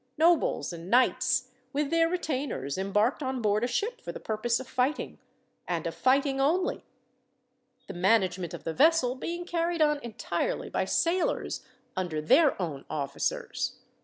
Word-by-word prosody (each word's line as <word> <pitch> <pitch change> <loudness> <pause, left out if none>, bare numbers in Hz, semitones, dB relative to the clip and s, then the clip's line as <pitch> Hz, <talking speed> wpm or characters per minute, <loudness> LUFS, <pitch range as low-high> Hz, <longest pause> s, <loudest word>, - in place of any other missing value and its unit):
Nobles 325 - +3
and 170 +1 -8
knights, 255 +1 +3 0.2
with 290 0 -1
their 330 0 +3
retainers, 285 - -2
embarked 210 +8 +1
on 260 -2 -2
board 210 -1 +1
a - - +2
ship 440 - -2
for - - -5
the - - -8
purpose 230 +2 -1
of 260 - -8
fighting, 255 +4 -1 0.5
and - - -2
of - - -2
fighting 270 +1 +2
only, 345 +7 +1 1.0
the - - -7
management 185 -2 +1
of - - -10
the 165 - -3
vessel 295 - +4
being 345 +6 -5
carried 340 0 -1
on 300 -1 +3
entirely 240 - -3
by - - 0
sailors 345 +2 0 0.3
under 175 -4 -2
their 270 - +4
own 155 -7 -3
officers. 140 -2 -2
255 Hz, 150 wpm, -28 LUFS, 205-320 Hz, 1.0 s, vessel